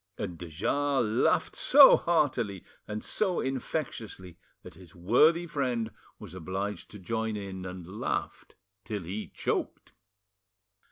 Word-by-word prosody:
And 95 -4 -4
de 85 - -7
Jars 135 - 0
laughed 110 +4 +1
so 275 +1 +8
heartily 130 - 0 0.2
and 105 0 -5
so 190 -5 0
infectiously 120 - -4 0.3
that - - -11
his 90 -1 -16
worthy 150 - +4
friend 125 -8 -2 0.3
was - - -11
obliged 95 +2 -4
to 105 - -10
join 110 +2 -3
in, 95 -2 -6
and 90 -1 -8
laughed 95 +5 -4 0.3
till 105 -3 -4
he 100 +6 -5
choked. - - -3
105 Hz, 125 wpm, -29 LUFS, 95-135 Hz, 0.3 s, so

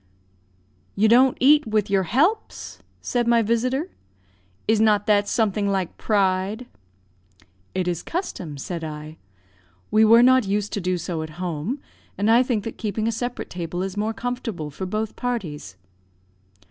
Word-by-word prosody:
"You 215 +2 +3
don't 250 +3 +5
eat 295 +1 +5
with 215 -2 +1
your 195 -1 +2
helps," 355 - 0 0.2
said 240 -2 0
my 235 -1 +4
visitor. 255 - 0 0.8
"Is 220 0 +3
not 210 -2 +3
that 205 -1 +3
something 210 -2 0
like 190 -3 -1
pride?" 200 +2 0 1.1
"It 185 -1 -1
is 175 -2 -1
custom," 185 - -5
said 170 +4 -5
I; 155 0 -7 0.7
"we 215 +1 +5
were 230 +2 +7
not 255 -3 +5
used 205 +1 -1
to 205 - -2
do 180 0 0
so 170 -2 -4
at 155 - -5
home, 180 - -3 0.4
and 205 +3 +2
I 235 +2 +6
think 240 -5 -1
that 225 - -7
keeping 220 0 -2
a - - +1
separate 245 +2 -4
table 175 +1 -4
is 190 0 -4
more 210 +1 -1
comfortable 225 - -4
for 185 +6 -5
both 215 +2 -3
parties." 165 - -4
210 Hz, 155 wpm, -23 LUFS, 185-235 Hz, 1.1 s, were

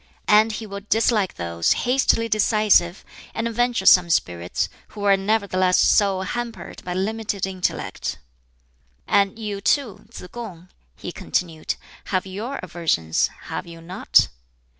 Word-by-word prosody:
And 215 +1 +5
he 220 - -5
will 200 -1 -7
dislike 220 -3 +2
those 85 -1 0
hastily 245 -2 +2
decisive 210 -4 +3 0.3
and 230 +1 -1
venturesome 220 -7 +4
spirits 90 - 0 0.2
who 205 -1 -9
are 200 -1 +5
nevertheless 195 -2 +1
so 195 -2 +3
hampered 235 +4 -5
by 180 0 -4
limited 205 0 -2
intellect." 185 -2 -3 0.9
"And 200 0 +2
you, 210 -3 -4
too, 240 -2 0
Tsz 235 - -10
kung," 185 -7 -9 0.3
he - - -7
continued, 165 -3 -2 0.3
"have 185 -1 -1
your 215 +9 -5
aversions, 165 - 0 0.2
have - - -5
you 165 -1 -10
not?" 175 +3 +2
200 Hz, 125 wpm, -23 LUFS, 180-220 Hz, 0.9 s, And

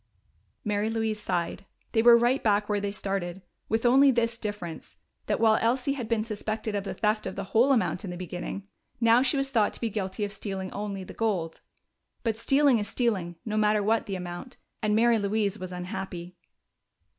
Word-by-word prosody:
Mary 210 +1 0
Louise 220 -1 -1
sighed. 175 -4 -2 0.3
They 225 - +3
were 235 0 +8
right 240 +3 +2
back 205 -1 +2
where 210 -1 +1
they 200 - -1
started, 195 -2 -3 0.3
with 225 +2 0
only 270 +3 +6
this 235 -2 +1
difference: 205 -7 -6 0.3
that - - 0
while 220 -1 +4
Elsie 250 +4 +1
had 250 -5 -4
been 225 -1 +1
suspected 215 0 -3
of 200 -1 -2
the - - -4
theft 215 -1 0
of 190 - -5
the 200 - -3
whole 240 +5 +5
amount 240 -3 +1
in 195 - -5
the 175 - -5
beginning, 180 +2 -6 0.3
now 230 +1 +5
she 265 +2 +2
was 275 0 -1
thought 220 -6 +2
to - - -4
be 230 -2 -2
guilty 200 0 -3
of 200 - -5
stealing 195 -2 -4
only 200 -2 -4
the - - -10
gold. 185 -8 -2 0.6
But 225 -3 0
stealing 270 +1 +4
is 205 - -3
stealing, 195 -9 -1
no 215 -1 -2
matter 210 -1 +3
what 225 +2 +1
the 195 - -3
amount, 180 +7 -7 0.2
and 210 -1 +2
Mary 230 0 +4
Louise 205 0 0
was 185 0 -6
unhappy. 180 0 -6
215 Hz, 195 wpm, -27 LUFS, 195-230 Hz, 0.6 s, were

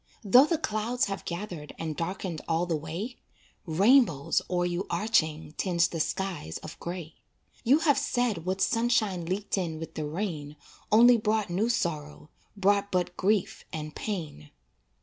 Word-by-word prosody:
Though 245 +8 +7
the 330 - +1
clouds 235 -2 -1
have 195 -1 -5
gathered 170 -4 -6
And 160 -2 -4
darkened 170 -1 -4
all 165 +2 +1
the 170 -2 -1
way, 165 - -5 0.5
Rainbows 190 - +4
o'er 175 -1 +1
you 175 +2 -2
arching 160 -8 +1
Tinge 175 -3 +2
the 165 - -4
skies 175 - -2
of - - -9
gray. 170 -2 -6 0.5
You 265 +5 +5
have 290 -4 +4
said 245 - 0
what 190 +2 -2
sunshine 225 -7 +1
Leaked 195 +2 -1
in 165 -4 -3
with 160 0 -7
the 155 -1 -3
rain 155 -4 -4 0.4
Only 235 +3 +7
brought 215 -3 0
new 205 +7 +1
sorrow, 155 -8 -2 0.3
Brought 200 +1 +2
but 180 -1 0
grief 200 0 0
and 155 -1 -5
pain. 155 - -5
185 Hz, 150 wpm, -28 LUFS, 160-215 Hz, 0.5 s, Though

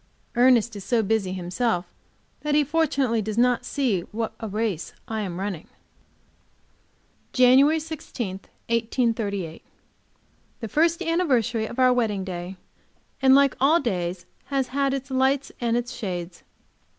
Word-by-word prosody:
Ernest 240 -2 +4
is 200 - -7
so 230 +1 +1
busy 200 -2 0
himself 185 +2 -1 0.5
that 300 -1 -1
he 300 - +5
fortunately 275 -6 +1
does 215 +1 -4
not 245 0 +3
see 245 -11 0
what 225 +1 -3
a 225 - -4
race 210 -4 -2
I 220 -1 -3
am 185 -3 -4
running. 190 -5 -4 1.7
JANUARY 270 +5 +5
16, 265 -11 -5 0.3
1838. 225 -7 -1 1.0
The 225 - -5
first 335 - +2
anniversary 260 - +1
of 235 - -9
our 255 -1 +5
wedding 215 -6 0
day, 180 0 -6 0.7
and 265 0 +6
like 280 -1 +4
all 305 +5 +5
days, 180 - -2 0.2
has 270 -2 -1
had 275 0 0
its 270 0 -6
lights 265 +1 +1
and 235 0 +1
its 240 0 -3
shades. 175 -3 -5
235 Hz, 135 wpm, -24 LUFS, 200-270 Hz, 1.7 s, and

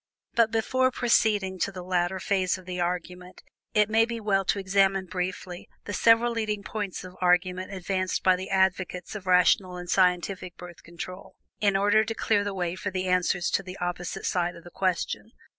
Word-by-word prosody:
But, 230 -1 +4
before 255 +4 +1
proceeding 215 -6 +1
to 200 - 0
the 185 -2 -8
latter 180 +1 0
phase 185 -1 0
of 185 - -14
the 180 0 -5
argument, 180 +1 -4 0.3
it 210 -1 +5
may 220 +1 +4
be 230 0 -3
well 200 -3 +1
to 190 - +1
examine 195 0 +2
briefly 180 0 -5 0.2
the 205 - -5
several 230 +3 +4
leading 215 -3 -2
points 205 -2 -4
of 185 0 -10
argument 180 +1 +1
advanced 185 0 -2
by 185 -1 +5
the 185 +1 -6
advocates 190 -1 0
of 200 -3 -8
rational 180 0 +4
and 180 0 -7
scientific 180 0 +1
Birth 175 -1 -11
Control, 180 +2 -9 0.2
in 200 -2 +3
order 205 +2 +4
to 225 +1 -4
clear 205 -2 +1
the 205 -1 -3
way 175 -2 -1
for 195 +2 -4
the 185 -1 -3
answers 180 -1 +1
to - - +1
the 185 0 -9
opposite 175 0 -4
side 175 -1 0
of 170 - -13
the 175 - -12
question. 190 +4 -2
185 Hz, 190 wpm, -27 LUFS, 180-205 Hz, 0.3 s, it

